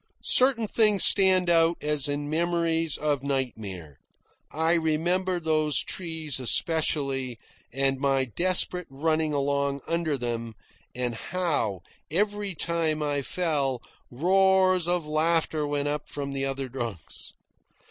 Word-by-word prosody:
Certain 250 Hz, -4 st, +3 dB
things 210 Hz, -2 st, +4 dB
stand 190 Hz, -2 st, +7 dB
out, 165 Hz, 0 st, +3 dB
as 150 Hz, -2 st, 0 dB
in 145 Hz, 0 st, -3 dB
memories 165 Hz, 0 st, 0 dB
of 145 Hz, -3 st, -1 dB
nightmare. 110 Hz, -, -5 dB, 0.5 s
I 160 Hz, +2 st, +1 dB
remember 175 Hz, +3 st, 0 dB
those 155 Hz, -3 st, +1 dB
trees 160 Hz, -6 st, -2 dB
especially, 135 Hz, -, 0 dB, 0.3 s
and 135 Hz, +1 st, 0 dB
my 135 Hz, -1 st, +1 dB
desperate 180 Hz, -, +1 dB
running 155 Hz, +3 st, -1 dB
along 140 Hz, -1 st, -1 dB
under 165 Hz, -3 st, -1 dB
them, 115 Hz, -2 st, -4 dB, 0.4 s
and 125 Hz, -1 st, -2 dB
how, 115 Hz, -, -2 dB, 0.3 s
every 205 Hz, +2 st, -1 dB
time 160 Hz, -1 st, -1 dB
I 145 Hz, -1 st, -1 dB
fell, 140 Hz, -6 st, -2 dB, 0.3 s
roars 185 Hz, +4 st, +2 dB
of 175 Hz, -2 st, -1 dB
laughter 155 Hz, 0 st, 0 dB
went 145 Hz, 0 st, -2 dB
up 150 Hz, 0 st, -4 dB
from 140 Hz, -1 st, -5 dB
the 135 Hz, 0 st, -2 dB
other 135 Hz, 0 st, -4 dB
drunks. 120 Hz, -, -6 dB
155 Hz, 120 wpm, -26 LUFS, 135-170 Hz, 0.5 s, stand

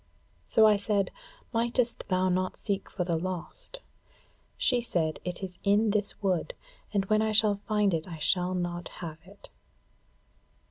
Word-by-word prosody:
So 220 Hz, -, +6 dB
I 210 Hz, -1 st, +6 dB
said: 200 Hz, -1 st, 0 dB, 0.4 s
'Mightest 235 Hz, +1 st, 0 dB
thou 185 Hz, 0 st, +2 dB
not 185 Hz, 0 st, 0 dB
seek 200 Hz, -2 st, -2 dB
for 180 Hz, -, -2 dB
the 170 Hz, -1 st, 0 dB
lost?' 185 Hz, -, -5 dB, 0.8 s
She 245 Hz, -2 st, +3 dB
said, 165 Hz, -9 st, -1 dB
'It 180 Hz, +1 st, -5 dB
is 180 Hz, -2 st, -6 dB
in 205 Hz, +2 st, +4 dB
this 205 Hz, -1 st, -1 dB
wood, 195 Hz, -, 0 dB, 0.4 s
but 195 Hz, -2 st, 0 dB
when 215 Hz, +1 st, +3 dB
I 220 Hz, 0 st, +1 dB
shall 210 Hz, -1 st, +3 dB
find 210 Hz, -3 st, +2 dB
it 160 Hz, +1 st, -1 dB
I 170 Hz, -3 st, -6 dB
shall 180 Hz, +4 st, +1 dB
not 175 Hz, -1 st, -2 dB, 0.2 s
have 160 Hz, -1 st, -7 dB
it.' 200 Hz, +2 st, -15 dB
195 Hz, 155 wpm, -29 LUFS, 180-215 Hz, 0.8 s, So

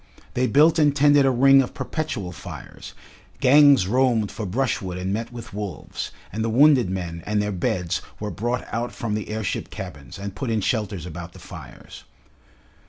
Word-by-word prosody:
They 125 Hz, +1 st, +1 dB
built 155 Hz, +5 st, +4 dB
and 145 Hz, -2 st, +4 dB
tended 145 Hz, -1 st, +5 dB
a -, -, +5 dB
ring 135 Hz, +2 st, +6 dB
of 125 Hz, -, -5 dB
perpetual 130 Hz, -, -4 dB
fires, 80 Hz, -, -10 dB, 0.4 s
gangs 140 Hz, -5 st, +6 dB
roamed 120 Hz, -2 st, +2 dB
for 105 Hz, -, -5 dB
brushwood 95 Hz, -4 st, -1 dB
and 95 Hz, +2 st, -2 dB
met 115 Hz, +3 st, -3 dB
with 120 Hz, -4 st, -9 dB
wolves, 100 Hz, -6 st, -5 dB, 0.2 s
and 110 Hz, +2 st, -2 dB
the 115 Hz, -, 0 dB
wounded 130 Hz, -2 st, +5 dB
men 90 Hz, -3 st, -4 dB
and 105 Hz, 0 st, +1 dB
their 105 Hz, 0 st, -1 dB
beds 90 Hz, -2 st, -1 dB, 0.2 s
were 105 Hz, 0 st, -4 dB
brought 120 Hz, +3 st, -3 dB
out 120 Hz, +2 st, -2 dB
from 115 Hz, -3 st, -4 dB
the 105 Hz, 0 st, -3 dB
airship 110 Hz, -2 st, -3 dB
cabins, 75 Hz, -10 st, -8 dB
and 100 Hz, 0 st, -6 dB
put 95 Hz, +6 st, -4 dB
in 110 Hz, -1 st, +1 dB
shelters 100 Hz, -5 st, -2 dB
about 85 Hz, +1 st, -8 dB
the -, -, -13 dB
fires. -, -, -11 dB
110 Hz, 175 wpm, -23 LUFS, 95-130 Hz, 0.4 s, ring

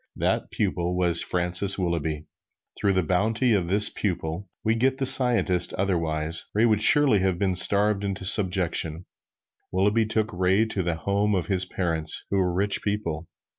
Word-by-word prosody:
This -, -, -1 dB
pupil 90 Hz, 0 st, -2 dB
was 85 Hz, -2 st, +3 dB
Francis 90 Hz, +2 st, 0 dB
Willughby. 80 Hz, -4 st, -3 dB, 0.5 s
Through 100 Hz, -, +1 dB
the 95 Hz, -1 st, 0 dB
bounty 110 Hz, +8 st, 0 dB
of 95 Hz, -5 st, -1 dB
this 100 Hz, +3 st, +4 dB
pupil 90 Hz, -1 st, -4 dB
we 110 Hz, -, +1 dB
get 130 Hz, +3 st, 0 dB
the 135 Hz, -, -2 dB
scientist 120 Hz, -9 st, +4 dB
otherwise, 80 Hz, -4 st, -2 dB
Ray 110 Hz, +3 st, +3 dB
would 110 Hz, -2 st, +1 dB
surely 140 Hz, -3 st, +4 dB
have 95 Hz, -2 st, -1 dB
been 95 Hz, -1 st, -1 dB
starved 100 Hz, +2 st, 0 dB
into 100 Hz, -1 st, -4 dB
subjection. 90 Hz, -4 st, +2 dB, 0.7 s
Willughby 105 Hz, +4 st, +1 dB
took 110 Hz, 0 st, -2 dB
Ray 95 Hz, +4 st, +1 dB
to 110 Hz, -3 st, -4 dB
the 85 Hz, -2 st, -2 dB
home 100 Hz, +4 st, -1 dB
of 90 Hz, -, -2 dB
his 95 Hz, -2 st, -1 dB
parents, 80 Hz, -4 st, -4 dB
who 100 Hz, -, 0 dB
were 90 Hz, -2 st, 0 dB
rich 100 Hz, +3 st, 0 dB
people. 85 Hz, -6 st, -4 dB
95 Hz, 165 wpm, -24 LUFS, 85-105 Hz, 0.7 s, this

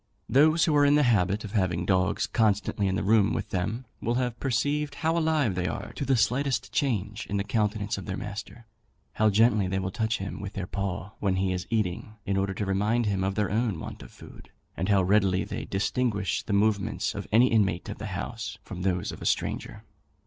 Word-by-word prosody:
Those 155 Hz, +4 st, +5 dB
who 155 Hz, -, +2 dB
are 145 Hz, -, +5 dB
in 145 Hz, 0 st, +5 dB
the 150 Hz, -, +4 dB
habit 105 Hz, -4 st, +2 dB
of 105 Hz, -, -7 dB
having 90 Hz, -5 st, 0 dB
dogs 95 Hz, -1 st, +1 dB
constantly 105 Hz, -2 st, +1 dB
in 95 Hz, -, 0 dB
the -, -, -1 dB
room 105 Hz, +1 st, +4 dB
with -, -, -3 dB
them, 105 Hz, +7 st, -2 dB, 0.2 s
will 120 Hz, +2 st, 0 dB
have 125 Hz, -2 st, -1 dB
perceived 145 Hz, +3 st, 0 dB
how 160 Hz, +2 st, 0 dB
alive 155 Hz, -, +2 dB
they 90 Hz, 0 st, -1 dB
are -, -, -5 dB
to 140 Hz, -, -4 dB
the 135 Hz, -1 st, +3 dB
slightest 125 Hz, +1 st, 0 dB
change 110 Hz, -5 st, -1 dB
in 100 Hz, -, -2 dB
the 100 Hz, -, 0 dB
countenance 105 Hz, -1 st, -1 dB
of 95 Hz, -, -9 dB
their 95 Hz, 0 st, -3 dB
master; 105 Hz, +3 st, -7 dB, 0.5 s
how 110 Hz, 0 st, +3 dB
gently 105 Hz, -1 st, +4 dB
they 95 Hz, +1 st, -1 dB
will 95 Hz, 0 st, -2 dB
touch 110 Hz, +2 st, 0 dB
him 100 Hz, +1 st, -5 dB
with 100 Hz, -2 st, -6 dB
their 95 Hz, -, -3 dB
paw 100 Hz, -1 st, -4 dB
when 95 Hz, -2 st, +1 dB
he 95 Hz, 0 st, 0 dB
is 90 Hz, -1 st, -4 dB
eating, 105 Hz, -1 st, -2 dB
in 100 Hz, -1 st, 0 dB
order 95 Hz, 0 st, 0 dB
to 105 Hz, -, -2 dB
remind 105 Hz, +5 st, +1 dB
him 100 Hz, -2 st, 0 dB
of 95 Hz, 0 st, -1 dB
their 105 Hz, -2 st, 0 dB
own 110 Hz, -5 st, 0 dB
want -, -, -7 dB
of -, -, -11 dB
food; -, -, -14 dB, 0.3 s
and 90 Hz, +4 st, -2 dB
how 100 Hz, -2 st, +4 dB
readily 95 Hz, -1 st, +3 dB
they -, -, -5 dB
distinguish 105 Hz, 0 st, 0 dB
the -, -, -6 dB
movements 100 Hz, 0 st, +1 dB
of -, -, -6 dB
any 120 Hz, +4 st, +5 dB
inmate 95 Hz, -6 st, +1 dB
of -, -, -6 dB
the -, -, -5 dB
house -, -, -5 dB
from 90 Hz, -, -7 dB
those 90 Hz, -1 st, 0 dB
of -, -, -10 dB
a -, -, -6 dB
stranger. -, -, -2 dB
105 Hz, 220 wpm, -27 LUFS, 95-120 Hz, 0.5 s, Those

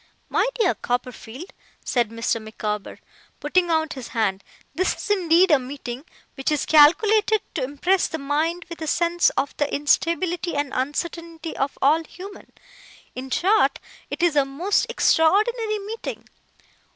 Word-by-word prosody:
'My -, -, +2 dB
dear 440 Hz, -7 st, +2 dB
Copperfield,' 250 Hz, -, -5 dB, 0.3 s
said 240 Hz, -4 st, +1 dB
Mr. 230 Hz, 0 st, -2 dB
Micawber, 210 Hz, -1 st, -5 dB, 0.4 s
putting 350 Hz, +4 st, +1 dB
out 320 Hz, -1 st, +1 dB
his 260 Hz, -4 st, -8 dB
hand, 200 Hz, -4 st, -1 dB, 0.3 s
'this 370 Hz, +2 st, 0 dB
is -, -, -8 dB
indeed 360 Hz, -2 st, +4 dB
a 295 Hz, -, +6 dB
meeting 260 Hz, 0 st, -7 dB, 0.3 s
which 270 Hz, +2 st, -2 dB
is 300 Hz, -, 0 dB
calculated 415 Hz, +8 st, +5 dB
to -, -, -2 dB
impress 345 Hz, +8 st, +1 dB
the 320 Hz, -, -5 dB
mind 315 Hz, +5 st, -1 dB
with 335 Hz, -1 st, -9 dB
a 315 Hz, -, -4 dB
sense 345 Hz, +2 st, +2 dB
of 280 Hz, -, -1 dB
the 290 Hz, -1 st, -1 dB
instability 335 Hz, +4 st, 0 dB
and 285 Hz, -1 st, -1 dB
uncertainty 325 Hz, +4 st, -4 dB
of 275 Hz, +1 st, -2 dB
all 310 Hz, +4 st, +4 dB
human 385 Hz, +5 st, -12 dB, 0.6 s
in 260 Hz, +1 st, -7 dB
short, 390 Hz, +11 st, +2 dB, 0.3 s
it -, -, -4 dB
is 340 Hz, -4 st, +3 dB
a 285 Hz, -, +5 dB
most 340 Hz, -, 0 dB
extraordinary 430 Hz, +2 st, +2 dB
meeting. 425 Hz, +3 st, -7 dB
320 Hz, 145 wpm, -23 LUFS, 270-365 Hz, 0.6 s, a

